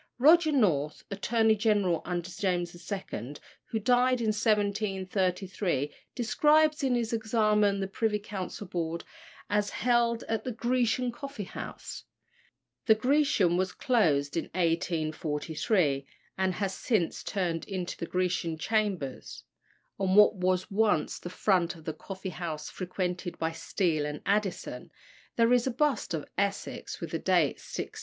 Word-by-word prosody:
Roger 315 Hz, +5 st, +6 dB
North, 160 Hz, -, +1 dB
Attorney 220 Hz, +2 st, +2 dB
General 205 Hz, -6 st, +2 dB
under 175 Hz, -1 st, -2 dB
James 180 Hz, -2 st, -1 dB, 0.2 s
II., 150 Hz, -, -5 dB, 0.3 s
who 225 Hz, -, -3 dB
died 250 Hz, +3 st, +3 dB
in 225 Hz, -2 st, 0 dB
1733, 195 Hz, -, 0 dB, 0.2 s
describes 300 Hz, +5 st, +3 dB
in 260 Hz, -2 st, +2 dB
his 235 Hz, -1 st, -1 dB
Examen 215 Hz, -2 st, +2 dB
the 195 Hz, -, -1 dB
Privy 210 Hz, +2 st, 0 dB
Council 205 Hz, -1 st, -6 dB
Board, 170 Hz, -2 st, -3 dB, 0.4 s
as 205 Hz, 0 st, +1 dB
held 235 Hz, -1 st, +1 dB
at 220 Hz, -1 st, -2 dB
the 255 Hz, -, -3 dB
Grecian 245 Hz, +1 st, +1 dB
coffee 275 Hz, -3 st, -6 dB
house. -, -, -7 dB, 0.8 s
The 220 Hz, -, +7 dB
Grecian 235 Hz, -, +3 dB
was 185 Hz, 0 st, 0 dB
closed 155 Hz, -, +2 dB
in 165 Hz, -, 0 dB
1843, 160 Hz, -, 0 dB, 0.3 s
and 190 Hz, -1 st, 0 dB
has 195 Hz, -1 st, -1 dB
been -, -, -9 dB, 0.3 s
since -, -, -9 dB
turned 175 Hz, -4 st, -2 dB
into 185 Hz, -3 st, -4 dB
the 170 Hz, -, -5 dB
Grecian 180 Hz, -3 st, -1 dB
Chambers. 175 Hz, -, -2 dB, 0.6 s
On 190 Hz, -1 st, +1 dB
what 210 Hz, 0 st, +8 dB
was 185 Hz, 0 st, 0 dB
once 210 Hz, -6 st, +1 dB
the 175 Hz, -, -7 dB
front 180 Hz, -2 st, +1 dB
of 160 Hz, -2 st, -15 dB
the 160 Hz, -, -2 dB
coffee 190 Hz, +2 st, -7 dB
house 160 Hz, -3 st, -5 dB
frequented 180 Hz, -1 st, -3 dB
by 160 Hz, 0 st, -1 dB
Steele 160 Hz, -2 st, -1 dB
and 150 Hz, 0 st, -5 dB
Addison, 205 Hz, -1 st, -1 dB, 0.5 s
there 230 Hz, +1 st, +4 dB
is 245 Hz, +1 st, +3 dB
a -, -, +1 dB
bust 260 Hz, -, 0 dB
of 155 Hz, -, -5 dB
Essex, 200 Hz, 0 st, -2 dB
with -, -, -6 dB
the -, -, -1 dB
date -, -, +2 dB
1676. 435 Hz, -, -6 dB
195 Hz, 140 wpm, -29 LUFS, 175-225 Hz, 0.8 s, what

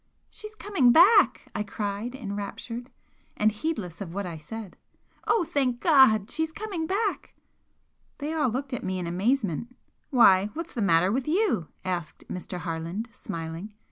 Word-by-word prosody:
"She's 425 Hz, 0 st, -9 dB
coming 390 Hz, -, +3 dB
back!" 395 Hz, -, +5 dB
I -, -, -2 dB
cried, 210 Hz, +3 st, -4 dB
enraptured, 230 Hz, +2 st, -6 dB, 0.5 s
and 215 Hz, +1 st, +3 dB
heedless 210 Hz, -, -4 dB
of 180 Hz, -3 st, -6 dB
what 200 Hz, -1 st, -2 dB
I 170 Hz, -2 st, -5 dB
said 200 Hz, +6 st, -8 dB, 0.5 s
"Oh, 450 Hz, -, +3 dB
thank 260 Hz, -6 st, 0 dB
God! 260 Hz, -, +5 dB
She's 320 Hz, +1 st, -1 dB
coming 375 Hz, -4 st, -4 dB
back!" 405 Hz, +2 st, -2 dB, 0.8 s
They 295 Hz, +2 st, -3 dB
all 300 Hz, -5 st, +2 dB
looked 260 Hz, +3 st, -4 dB
at 250 Hz, -, -3 dB
me 185 Hz, 0 st, -2 dB
in 180 Hz, -, -3 dB
amazement. 210 Hz, -, -1 dB, 0.3 s
"Why, 200 Hz, -7 st, +6 dB
what's 335 Hz, +1 st, -5 dB
the 235 Hz, -, -3 dB
matter 180 Hz, -1 st, +4 dB
with 255 Hz, +4 st, -1 dB
you?" 340 Hz, -, +1 dB, 0.2 s
asked 175 Hz, -4 st, -4 dB
Mr. 180 Hz, 0 st, -5 dB
Harland, 170 Hz, +7 st, -4 dB
smiling. 165 Hz, +4 st, -6 dB
225 Hz, 150 wpm, -27 LUFS, 185-300 Hz, 0.8 s, Why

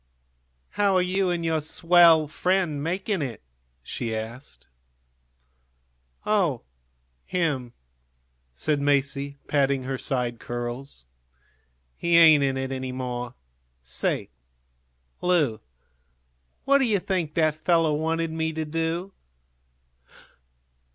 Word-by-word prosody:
"How 200 Hz, -2 st, +2 dB
are 185 Hz, -, +4 dB
you 185 Hz, +1 st, 0 dB
and 170 Hz, -1 st, -1 dB
your 160 Hz, -1 st, +1 dB
swell 165 Hz, 0 st, +5 dB
friend 175 Hz, -2 st, 0 dB
making 190 Hz, +3 st, -1 dB
it? 120 Hz, -, -5 dB, 0.4 s
she 115 Hz, -, -4 dB
asked. 115 Hz, +5 st, -7 dB, 1.6 s
"Oh, 180 Hz, -, +1 dB, 0.6 s
him?" 145 Hz, -9 st, -1 dB, 0.8 s
said 145 Hz, -, -1 dB
Masie, 140 Hz, 0 st, 0 dB
patting 140 Hz, -2 st, +1 dB
her 130 Hz, 0 st, -4 dB
side 125 Hz, -4 st, -2 dB
curls. 120 Hz, -, -6 dB, 0.9 s
"He 170 Hz, 0 st, +2 dB
ain't 155 Hz, -4 st, +7 dB
in 135 Hz, -1 st, 0 dB
it 130 Hz, 0 st, -3 dB
any 130 Hz, -1 st, -4 dB
more. 125 Hz, -1 st, -5 dB, 0.5 s
Say, 60 Hz, 0 st, -2 dB, 0.9 s
Lu, 155 Hz, -11 st, +2 dB, 1.1 s
what 280 Hz, 0 st, +5 dB
do 265 Hz, -, +3 dB
you 215 Hz, -4 st, +2 dB
think 180 Hz, -5 st, -2 dB
that 155 Hz, -1 st, +1 dB
fellow 165 Hz, -3 st, +3 dB
wanted 160 Hz, +2 st, -1 dB
me 160 Hz, 0 st, -2 dB
to 160 Hz, 0 st, -3 dB
do?" 165 Hz, +4 st, -2 dB
155 Hz, 105 wpm, -25 LUFS, 130-170 Hz, 1.6 s, ain't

